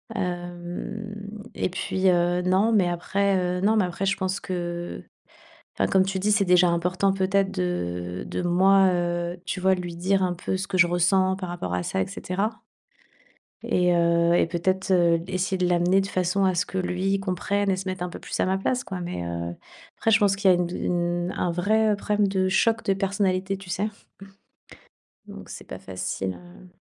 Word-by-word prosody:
Hem 180 +4 -5 0.2
et - - -1
puis, 190 +1 0
heu, 175 0 +2
non, 190 +5 +2
mais 195 -5 +3
après, 195 +3 0 0.2
heu, - - -5
non, 215 +3 +3
mais 195 - +3
après, 180 +2 -3
je 195 - +1
pense 190 0 -2
que 175 -1 -5 0.7
enfin - - 0
comme 190 -1 +4
tu 190 -1 -2
dis, 210 +2 +1
c'est 205 -1 +3
déjà 180 -1 +5
important, 180 +3 +1
peut-être, 195 0 +1
de 90 0 -3
de - - -3
moi, 190 +2 +4
heu, 175 0 -1
tu 190 - -3
vois, 190 0 +4
lui 175 -2 -6
dire 190 +2 +1
un 180 -1 0
peu 180 +2 -3
ce 190 +2 -4
que 185 - -1
je 175 - +7
ressens 185 +2 +2
par 185 -2 -6
rapport 90 - -4
à 90 - -1
ça 95 - -2
et 95 - 0
cetera 195 +5 -2 1.1
et 180 -1 +2
heu 170 0 +3
et 175 - +3
peut-être, 185 +3 -1
heu, 170 -2 +4
essayer 185 0 -1
de 180 -1 +1
l'amener 180 +2 +3
de - - -4
façon 185 +1 0
à 185 -1 +2
ce 180 +1 0
que 190 - -7
lui 185 +2 0
comprenne 195 +1 -1
et 185 - +1
se 190 0 -5
mette 185 -1 -4
un 180 - -3
peu - - -8
plus - - -5
à - - +2
ma 190 +1 +1
place, 250 +5 -1
quoi. 185 -2 -5
Mais, 175 - -4
heu, 85 0 -4 0.4
après, 225 - +1
je 215 - +6
pense 200 -1 +3
qu'il 195 -1 +3
y - - +7
a - - +2
une 175 -1 0
dou 175 - -5
une 175 0 -1
un 175 - 0
vrai, 215 +5 +2
heu, - - 0
problème 205 0 +1
de 190 -1 +1
choc 225 +4 +2
de 195 - +2
personnalité, 195 -1 0
tu 190 -2 -11
sais? 205 +5 -1 1.4
Donc - - -10
c'est - - -8
pas - - -8
facile, 95 0 -4
heu 180 +1 -15
185 Hz, 210 wpm, -25 LUFS, 175-195 Hz, 1.4 s, je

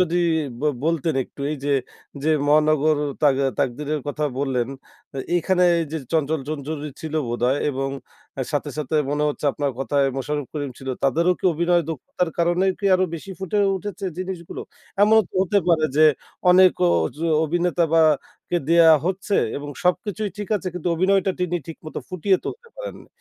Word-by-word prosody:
যদি 175 -1 +2 0.4
বল 150 0 +1
বলতেন 165 -1 0
একটু - - -16
এইযে, 145 -1 -3 0.5
যে 155 - 0 0.2
মহানগর, 155 0 +3 0.2
তাক 145 -3 +5 0.2
তাকদিরের 145 +3 -1
কথা 150 +1 -2
বললেন, 130 -4 0 0.5
এ - - -3 0.2
এখানে 180 +2 +1 0.2
এইযে 160 0 -3
চঞ্চল-চঞ্চল 150 -2 -1
চৌধুরী 150 -1 -4
ছিল 160 -1 -6
বোধহয় 125 +3 +1
এবং 135 0 -2 0.6
সাথে, 145 0 -1
সাথে 150 +1 -3 0.2
মনে 145 +1 0
হচ্ছে 150 - -5
আপনার 145 -1 -1
কথায় 135 +1 +1
মোশাররফ 145 +1 -2
করিম 145 -3 -3
ছিল। 135 - -8 0.2
তাদেরও 165 +6 +3
কি - - -14
অভিনয় 170 +2 +2
দক্ষতার 165 +3 -3
কারণে 175 +2 +2
কি 200 - -8
আরো 185 0 +3
বেশি 165 +4 -8
ফুটে 190 +2 -2 0.2
উঠেছে 200 +1 -6
জিনিসগুলো? 185 -2 -5 0.4
এমনও 220 +1 +6
তো - - -23
হতে 200 +2 +2
পারে 160 -2 +4
যে, - - +4 0.5
অনেক 185 0 +7 0.3
ওজো 150 - -4 0.2
অভিনেতা 175 +2 0
বা 165 - +6 0.5
কে 175 - +2
দেয়া 170 -1 +7 0.2
হচ্ছে 195 +2 -1 0.2
এবং 145 +1 -6 0.2
সবকিছুই 205 +3 0
ঠিক 205 - -5
আছে 185 - -4
কিন্তু 180 0 -2
অভিনয়টা 190 +3 +2
তিনি 175 -1 0
ঠিকমত 160 -1 -9
ফুটিয়ে 185 +1 +1
তুলতে 475 0 -7
পারেন - - -6
না। - - -18
160 Hz, 165 wpm, -23 LUFS, 145-180 Hz, 0.6 s, অনেক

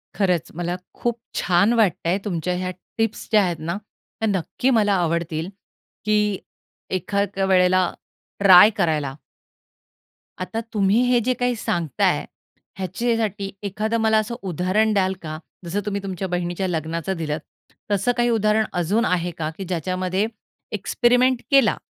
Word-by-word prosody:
खरंच 180 -5 0
मला 175 +1 -2 0.2
खूप 240 -1 -2 0.2
छान 190 +5 +3
वाटतं 200 -8 +2
आहे, 180 - +2
तुमच्या 180 -2 -1
ह्या 185 0 -2 0.3
टिप्स 225 -1 -1
ज्या 210 -2 +5
आहेत 175 -3 -1
ना, 170 +4 -3 0.4
त्या 220 - 0
नक्की 200 +6 0
मला 205 -1 +3
आवडतील 170 -1 -1 0.6
की 210 -2 +2 0.6
एखाद्या 200 +1 -1
वेळेला 185 -1 +3 0.5
ट्राय 195 0 +9
करायला. 155 -7 0 1.3
आता 225 +5 -3
तुम्ही 205 +2 +3
हे 245 - +5
जे 255 +3 +1
काही 245 0 +1
सांगत 170 - -3
आहे, - - +3 0.5
ह्याच्यासाठी 200 +1 -1
एखादं 215 +3 -1
मला 220 0 +4
असं 215 +2 -3
उदाहरण 190 +4 +1
द्याल 190 -2 +2
का? 155 -1 -5 0.3
जसं 185 +5 -2
तुम्ही 200 -1 -2
तुमच्या 190 -1 -3
बहिणीच्या 175 +1 -2
लग्नाचं 165 +2 -2
दिलत. 155 -2 -2 0.5
तसं 205 +4 +2
काही 240 0 +3
उदाहरण 215 -1 +2 0.2
अजून 205 +8 +1
आहे 175 -1 0
का 155 -1 -2
की 195 - -4
ज्याच्यामध्ये 185 +2 -1 0.5
एक्सपेरिमेंट 245 +4 +2
केला 270 -7 +5
190 Hz, 140 wpm, -22 LUFS, 175-215 Hz, 1.3 s, ट्राय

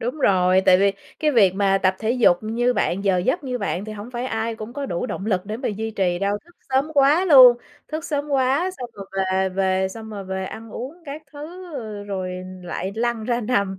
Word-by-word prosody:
Đúng 245 +6 -3
rồi, 185 -6 +4
tại 185 -1 +5
vì 200 0 +3 0.3
cái 305 - +2
việc 200 -9 +4
mà 195 -1 +2
tập 185 -1 +1
thể 220 - -1
dục 240 -8 +4
như 235 +3 +1
bạn, 195 -4 -1
giờ 190 -2 +3
giấc 260 - 0
như 250 -2 -3
bạn 200 -2 -2
thì 215 - -6
hổng 215 +3 -8
phải 245 0 -4
ai 225 -1 -2
cũng 220 +2 -8
có 280 +1 -4
đủ 175 +2 -2
động 195 - -5
lực 190 -3 0
để 215 +2 -4
mà 260 - -3
duy 220 +2 -3
trì 185 -4 0
đâu, 200 +2 0
thức 345 +1 -22 0.2
sớm 270 +4 +1
quá 290 +6 +4
luôn, 255 -8 +9 0.3
thức 310 +1 -4
sớm 295 -3 -2
quá 275 +6 +1
xong 245 -2 -6
rồi 195 -1 -9 0.3
về 190 0 +2
về 190 0 0
xong 220 +3 -9
rồi 200 -2 -6
về 190 0 -4
ăn 220 +3 -8
uống 255 +7 -6
các 295 +1 -7
thứ, 335 +4 -9
ờ, 215 -6 -6
rồi 190 -2 -4 0.3
lại 185 +2 -4
lăn 235 0 -1
ra 240 +1 0
nằm, 200 -5 0
220 Hz, 235 wpm, -22 LUFS, 195-260 Hz, 0.3 s, luôn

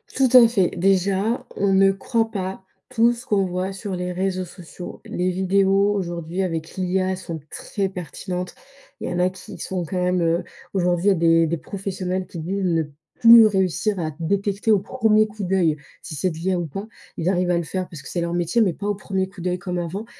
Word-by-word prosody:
Tout 265 -1 +3
à 245 -2 +9
fait. 195 -6 +2
Déjà, 195 +4 +1
on 195 -1 +1
ne 195 0 +5
croit 225 +3 -1
pas 190 -2 -4 0.3
tout 240 -1 +3
ce 240 0 -10
qu'on 200 -2 +2
voit 185 +1 -2
sur 195 0 -5
les 180 0 -3
réseaux 185 0 -1
sociaux. 175 0 -10
Les 180 +1 -1
vidéos, 195 +2 +2
aujourd'hui, 175 -2 -3
avec 165 -3 -3
l'IA, 185 0 0
sont 170 -3 -6
très 200 -2 -3
pertinentes. 180 +1 -5 0.5
Il - - -3
y - - -3
en 175 - -1
a 180 +1 +3
qui 185 0 -11
sont 180 -3 -3
quand 180 +3 -2
même 180 0 +1
heu, 170 +1 +1 0.3
aujourd'hui, 180 -1 +1
il - - +8
y - - +6
a - - +5
des 165 -1 +4
des 170 +1 -1
professionnels 185 0 -4
qui 175 -1 -8
disent 190 +5 -2
ne 165 -3 +2 0.4
plus 230 -1 +10
réussir 190 0 0
à 155 -2 -2
détecter, 200 +5 0
au 205 - +5
premier 215 0 +2
coup 210 -1 -7
d'œil, 180 -4 +2 0.3
si 155 - -7
c'est 165 +6 0
de 160 - -7
l'IA 185 +2 0
ou 175 - -2
pas. 195 +8 -6 0.3
Il 165 - -2
arrivent 180 -1 +1
à 175 - +2
le 170 - -1
faire 185 +3 -3
parce 160 -4 -9
que - - -12
c'est 175 - -2
leur 170 0 -2
métier, 175 +7 +1
mais 190 -5 +3
pas 200 +4 -5
au 205 - 0
premier 190 -1 -2
coup 190 -1 -12
d'œil 180 0 -1
comme 180 0 -4
avant. 175 +5 -4
185 Hz, 225 wpm, -22 LUFS, 175-200 Hz, 0.5 s, plus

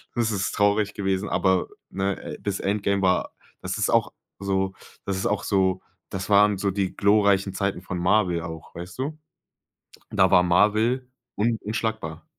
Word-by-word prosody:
Das 115 -2 +1
ist 95 -2 -1
traurig 105 0 +2
gewesen, 95 0 -1
aber, 95 -1 +2 0.2
ne? 95 0 -1
Äh, - - -7
das 100 -2 -2
Endgame 100 0 0
war 90 -1 +2 0.3
das - - -3
ist - - +1
auch - - +2 0.3
so 95 -1 -1 0.3
das 100 - -1
ist 95 - -3
auch 105 - -1
so, 95 -2 +1 0.3
das 95 +1 -4
waren 105 0 +5
so 100 +1 0
die 95 -1 -2
glorreichen 100 -2 +3
Zeiten 95 -2 -2
von 90 -1 -5
Marvel 90 -2 +2
auch, 80 -1 -9
weißt 90 +6 -8
du? 150 +3 -3 0.9
Da 95 -3 +3
war 90 -1 +6
Marvel 110 +8 +2 0.3
un 115 +2 +1
unschlagbar. 105 -7 -3
100 Hz, 165 wpm, -25 LUFS, 95-105 Hz, 0.9 s, war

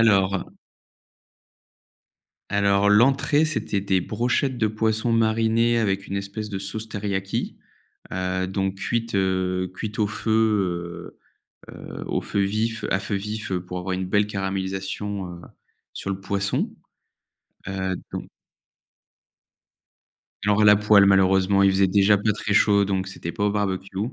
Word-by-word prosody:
alors 100 -4 +3 2.1
alors 100 0 +3
l'entrée 135 +7 +4
c'était 130 -10 -1
des 95 -1 +1
brochettes 125 +6 -1
de 110 - +2
poisson 110 +2 0
marinées 115 +1 +2
avec 100 -3 -1
une 100 - -3
espèce 100 +2 -5
de 95 - -3
sauce 110 +3 -3
teriyaki. 100 -2 -3 0.6
Heu, 95 0 -1
donc 95 0 -2
cuites, 115 +2 -2
heu, 95 -1 0
cuites 110 +3 -6
au 105 - +2
feu, 100 -6 -1 0.6
heu, - - -16
heu, - - -8
au - - 0
feu 100 - -2
vif 110 +3 -1
à 95 - +2
feu 100 +1 -4
vif 105 0 -4
pour 90 0 -3
avoir 90 +1 -4
une 95 0 -2
belle 105 +2 +2
caramélisation, 95 0 -3
heu, - - -12 0.5
sur 100 - -5
le 95 - -3
poisson. 100 0 -1 0.9
Heu, 95 -1 -2 0.2
donc - - -5 2.2
Alors 105 +1 +3
la 105 0 +8
poêle 105 -1 +5
malheureusement 95 0 +4
il 100 - +5
faisait 95 0 +3
déjà 100 +2 +4
pas 105 +2 +1
très 105 0 -2
chaud, 100 -1 +4
donc 95 -1 -1
c'était 85 -3 -6
pas 105 - -2
au 105 - +2
barbecue. 95 -2 -2
100 Hz, 140 wpm, -24 LUFS, 95-110 Hz, 2.2 s, la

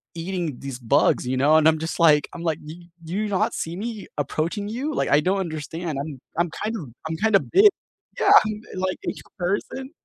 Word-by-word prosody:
eating 170 -5 -3
these 135 -2 -6
bugs, 120 +1 +2
you 130 0 0
know, 150 +4 +5
and 160 0 +5
I'm 160 0 +4
just 165 +2 -4
like 150 -3 +5
I'm 170 - -7
like, 160 -2 -1
"Do 155 - -7 0.3
do 165 - -6
you 215 +1 0
not 190 - +1
see 165 +1 -4
me 220 0 -5
approaching 165 - -2
you?" 275 +7 -3
Like, - - 0
I 145 - +5
don't 190 +4 +1
understand, 160 -2 -4
I'm 145 -3 -7 0.2
I'm 170 0 +2
kind 220 +2 -2
of 145 - -8 0.2
I'm 160 - -2
kinda 215 0 +4
big 400 +4 +6 0.5
yeah, - - +4
I'm 215 0 -4
like 185 0 -2
a - - +1 0.3
person, 260 - -2
170 Hz, 210 wpm, -24 LUFS, 155-205 Hz, 0.5 s, big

